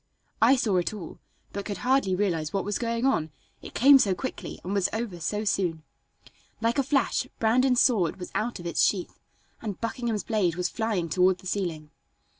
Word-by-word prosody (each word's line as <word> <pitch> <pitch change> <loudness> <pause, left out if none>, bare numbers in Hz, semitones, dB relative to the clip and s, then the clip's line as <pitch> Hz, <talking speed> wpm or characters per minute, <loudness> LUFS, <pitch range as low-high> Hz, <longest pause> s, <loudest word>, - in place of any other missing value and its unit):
I 240 +5 +6
saw 215 -7 +1
it 180 +4 -1
all, 180 -6 -9 0.3
but 200 0 -4
could 205 - -4
hardly 255 -8 +3
realize 170 -6 -1
what 195 - -1
was 205 0 -2
going 230 +1 -1
on, 165 - +1 0.3
it - - -11
came 275 +3 +7
so 195 -6 +2
quickly 260 - -6
and 185 - -3
was 200 -3 +2
over 220 -6 -4
so 210 +6 -2
soon. 175 -6 0 0.8
Like 230 +4 +1
a - - +3
flash 275 -1 +1
Brandon's 250 +3 +3
sword 200 -10 +2
was 180 - -8
out 235 -1 -2
of 175 - -9
its 170 - 0
sheath, 185 -4 0 0.4
and 210 -4 -5
Buckingham's 230 -2 -2
blade 195 -7 0
was 180 0 -1
flying 215 -6 -1
toward 180 +3 +3
the 185 - -17
ceiling. 170 -6 -3
205 Hz, 190 wpm, -27 LUFS, 180-230 Hz, 0.8 s, came